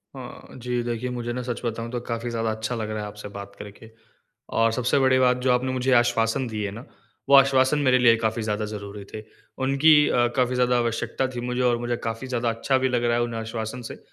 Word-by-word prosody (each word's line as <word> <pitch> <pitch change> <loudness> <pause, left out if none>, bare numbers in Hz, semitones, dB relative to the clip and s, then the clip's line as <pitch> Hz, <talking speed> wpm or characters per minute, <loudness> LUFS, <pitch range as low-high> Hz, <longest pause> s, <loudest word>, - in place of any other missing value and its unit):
अ, - - -8 0.4
जी, 125 0 -2
देखिए 120 +1 -3
मुझे 120 0 -4
ना 125 - -3
सच 120 - -3
बताऊँ 115 0 -3
तो 120 - -2
काफी 115 0 -3
ज़्यादा 115 -1 -1
अच्छा 110 +2 -3
लग 110 -2 -4
रहा 110 0 -3
है, 105 - -5
आपसे 105 0 -9
बात 100 0 -9
करके। 105 +2 -11 0.7
और 115 0 +4
सबसे 125 +3 +2
बड़ी 130 -1 +3
बात 125 -1 +3
जो - - +5
आपने 125 +1 +1
मुझे 130 0 0
आश्वासन 120 +1 +2
दिए 105 -2 -3
ना, 120 - -10 0.4
वो 140 - +7
आश्वासन 135 +1 +5
मेरे 125 0 +5
लिए 115 -2 +6
काफ़ी 110 +1 0
ज़्यादा 105 0 -2
ज़रूरी 100 -1 -7
थे। 110 0 -6 0.4
उनकी 140 +4 +5 0.2
अ, 120 -1 +3
काफ़ी 125 0 +2
ज़्यादा 125 0 +2
आवश्यकता 120 +2 -1
थी - - -3
मुझे 125 +1 -1
और 120 -1 +2
मुझे 120 0 -1
काफ़ी 115 +3 -4
ज़्यादा 120 -2 -1
अच्छा 115 +4 0
भी - - +2
लग 120 -1 +1
रहा 120 0 +2
है 120 - +1
उन्हें 115 -1 -5
आश्वासन 110 +2 -5
से। - - -10
120 Hz, 230 wpm, -24 LUFS, 115-125 Hz, 0.7 s, वो